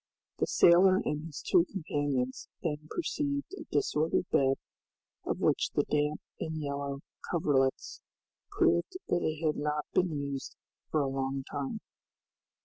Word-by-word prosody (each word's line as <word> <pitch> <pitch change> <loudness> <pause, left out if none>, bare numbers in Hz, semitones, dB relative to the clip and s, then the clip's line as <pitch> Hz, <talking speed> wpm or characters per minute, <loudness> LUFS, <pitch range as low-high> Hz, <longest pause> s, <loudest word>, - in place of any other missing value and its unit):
The - - +2
sailor 185 +2 +6
and 150 +2 -2
his 150 - -8
two 180 -3 +5
companions 145 -8 -1 0.2
then 150 -2 -2
perceived 290 -1 -2
a 330 -5 -9
disordered 150 +4 +1
bed, 135 0 +4 0.7
of - - -1
which - - +2
the - - +4
damp 150 0 0 0.2
and 160 -1 -3
yellow 140 -1 -3 0.3
coverlets 135 -6 +1 0.5
proved 370 - +2
that 175 - +2
it 155 +1 -1
had 155 - +2
not 150 0 -1
been 180 - +3
used 140 -3 -4 0.3
for 155 - +2
a 140 - +1
long 135 0 -2
time. 145 +9 -3
150 Hz, 140 wpm, -31 LUFS, 140-170 Hz, 0.7 s, sailor